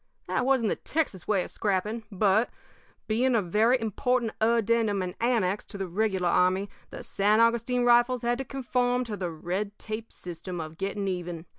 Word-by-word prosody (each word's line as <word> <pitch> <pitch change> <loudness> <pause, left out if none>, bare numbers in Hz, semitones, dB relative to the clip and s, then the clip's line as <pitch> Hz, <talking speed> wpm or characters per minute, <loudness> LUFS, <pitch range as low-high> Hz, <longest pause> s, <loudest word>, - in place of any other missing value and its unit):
"That 255 - 0
wasn't 260 -5 +3
the - - -1
Texas 295 - -2
way 200 -4 +2
of - - -8
scrapping; 210 +3 -1
but, 205 +3 +2 0.6
being 240 +3 +2
a - - +4
very 220 +8 +3
important 235 +1 0
addendum 225 -3 +2
and 180 -1 -4
annex 215 -5 +1
to 205 - -9
the 195 -1 -3
regular 190 -1 0
army, 185 +3 +2 0.2
the - - -8
San 210 +2 +2
Augustine 235 +2 +2
Rifles 240 +1 +4
had 240 +1 0
to - - -1
conform 250 -1 0
to 225 -4 -5
the 180 -3 -3
red 185 +6 -4
tape 220 +1 -6
system 175 +1 -7
of 160 0 -7
getting 200 +1 -2
even. 175 -3 -4
215 Hz, 175 wpm, -27 LUFS, 190-240 Hz, 0.6 s, a